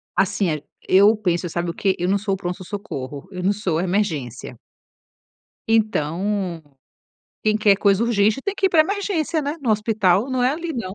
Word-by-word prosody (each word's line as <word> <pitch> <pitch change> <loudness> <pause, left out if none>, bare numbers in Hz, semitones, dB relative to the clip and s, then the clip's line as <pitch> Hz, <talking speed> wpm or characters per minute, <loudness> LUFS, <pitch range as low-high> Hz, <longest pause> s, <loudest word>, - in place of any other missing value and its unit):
Assim 190 -1 +1
é 150 -2 -3 0.3
eu 200 +4 +6
penso, 175 -4 -1
sabe 170 +1 -2
o 170 - -3
quê? 195 -2 0
Eu 175 - 0
não 200 +1 +2
sou 200 0 -2
o 195 - -1
pronto-socorro, 180 -6 -6
eu 180 -1 -6
não 195 - +3
sou 195 -6 -1
a 170 - 0
emergência. 155 - -2 1.1
Então, 195 -4 0 0.8
quem 215 0 +3
quer 210 -2 +4
coisa 200 +1 +3
urgente 215 +1 +2
tem 400 - -2
que 390 - -3
ir - - +3
pra 325 -3 +5
emergência, 345 -4 0
né. 290 +3 -3
No 250 -5 -1
hospital 210 +1 +2
não 255 -1 0
é 250 - +4
ali, 335 +1 -4
não. 215 -8 -5
200 Hz, 185 wpm, -22 LUFS, 180-225 Hz, 1.1 s, eu